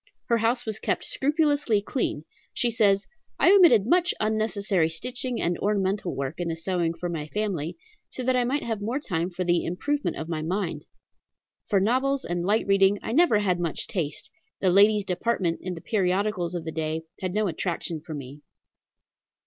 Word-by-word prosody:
Her 235 -1 +3
house 240 +2 +1
was 220 -2 -3
kept - - -1
scrupulously 290 -5 +1
clean. 200 - -2 0.3
She 240 - +1
says: 205 -3 +3 0.3
"I - - +5
omitted 325 - +6
much 350 +6 +3
unnecessary 215 -5 +1
stitching 245 +7 -4
and 175 0 0
ornamental 195 -2 0
work 135 +4 -4
in 175 - -2
the 165 - -2
sewing 170 0 -1
for 175 - -4
my 160 -3 -4
family, 180 -5 -3 0.3
so 255 - -5
that 255 +1 +2
I 250 - +3
might 275 +5 -1
have 225 -3 -3
more 230 +6 -1
time 180 - -2
for 185 0 -3
the 175 -1 +2
improvement 290 - -2
of 160 - -5
my 160 -2 -3
mind. 185 +6 -3 0.8
For 200 - +3
novels 260 +7 +1
and 175 0 -2
light 210 +4 +2
reading 195 0 +4
I - - -3
never 300 -4 +4
had 185 -4 +1
much 170 -3 -1
taste; 185 +2 -4 0.3
the 185 - +2
ladies' 205 +2 +5
department 185 -3 -1
in 185 -1 -4
the 165 - -9
periodicals 185 -3 0
of 170 -2 -4
the 160 - -3
day 160 0 -3 0.2
had 185 0 -3
no 215 0 +2
attraction 165 -1 -3
for 155 0 -7
me. 140 +1 -9
195 Hz, 180 wpm, -26 LUFS, 170-230 Hz, 0.8 s, omitted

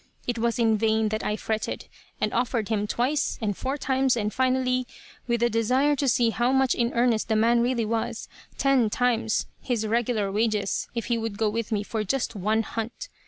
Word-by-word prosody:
It 240 -1 -2
was 235 0 0
in 225 -3 +2
vain 220 0 +2
that 215 0 -2
I 210 - 0
fretted, 220 0 -3 0.3
and 215 - -1
offered 235 -3 0
him 210 -2 0
twice, 260 +7 0
and 210 -3 -1
four 265 +7 -3
times, 265 -2 +1
and, 210 -2 -1
finally 255 -1 +1 0.4
with 235 -1 +1
a - - +5
desire 255 +6 +2
to 275 - 0
see 235 -2 +3
how 240 +3 +1
much 265 -2 +3
in 235 0 0
earnest 235 -2 +2
the 220 - +2
man 230 +2 +4
really 240 -1 +1
was 225 +1 -2 0.3
ten 270 -5 +3
times 230 -1 +1 0.2
his 235 -3 -1
regular 220 -2 0
wages 210 -1 0
if 235 - -2
he 235 -1 0
would 225 -2 -4
go 215 -1 +1
with 230 +1 -3
me 210 -1 0
for 215 +1 -3
just 235 +3 -1
one 215 +3 +1
hunt. 230 - -5
230 Hz, 200 wpm, -26 LUFS, 220-250 Hz, 0.4 s, a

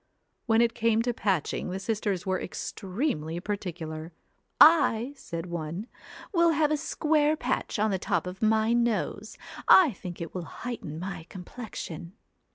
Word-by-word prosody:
When 225 0 +4
it 230 -1 +1
came 230 -1 +2
to 245 0 0
patching, 190 -8 -1
the 185 +1 -3
sisters 205 -3 -2
were 185 -1 0
extremely 180 - -3
particular. 175 -5 -5 0.3
' - - -48 0.3
I,' 235 +5 -4
said 170 -10 -6
one, 170 +3 -4 0.3
' - - -15
will 340 -2 +5
have 305 -1 +2
a - - +3
square 305 0 +1
patch - - -2
on 215 0 +2
the 190 - 0
top - - 0
of 180 +1 -7
my 220 +1 +3
nose. 235 -2 -1 0.3
I 350 -7 +8
think 180 -4 -8
it 165 -2 -6
will 180 -3 -7
heighten 225 -11 -5
my 180 -2 -6
complexion.' 180 -3 -7
205 Hz, 160 wpm, -28 LUFS, 175-235 Hz, 0.3 s, I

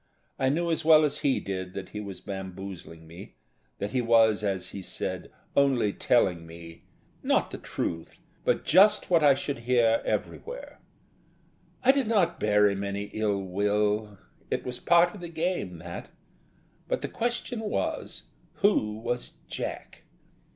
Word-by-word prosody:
I 130 - +2
knew 170 +4 0
as 160 - 0
well 155 -1 +7
as 145 - -1
he 140 -2 +2
did 95 -1 -5
that 95 -1 -6
he 105 - -6
was 100 -3 -7
bamboozling 95 -4 -7
me, 85 +4 -12 0.4
that 100 +1 -4
he 125 - +1
was, 115 -3 +4
as 95 -2 -2
he 100 - -7
said, - - -5 0.2
only 130 -7 +3
telling 90 -9 +2
me 85 0 -12 0.4
not - - +1
the - - -6
truth, 80 -1 -4 0.2
but - - +1
just 200 +4 +5
what 165 -3 +5
I 140 -2 +7
should 140 -1 -3
hear 115 -1 +3
everywhere. - - -4 1.0
I 265 - +7
did 270 -4 0
not 195 -7 +2
bear 105 -1 +4
him 100 0 -1
any 100 +1 -4
ill 105 -2 0
will; 105 +2 0 0.3
it - - -1
was 125 -1 -4
part 175 +1 +4
of 205 - -10
the 175 - -6
game, 160 - -2
that. 85 +1 -8 0.8
But - - -1
the - - -1
question 240 0 -2
was, 215 -1 -3 0.3
who 110 - +2
was 120 +2 -4
Jack? - - -6
110 Hz, 155 wpm, -27 LUFS, 100-160 Hz, 1.0 s, well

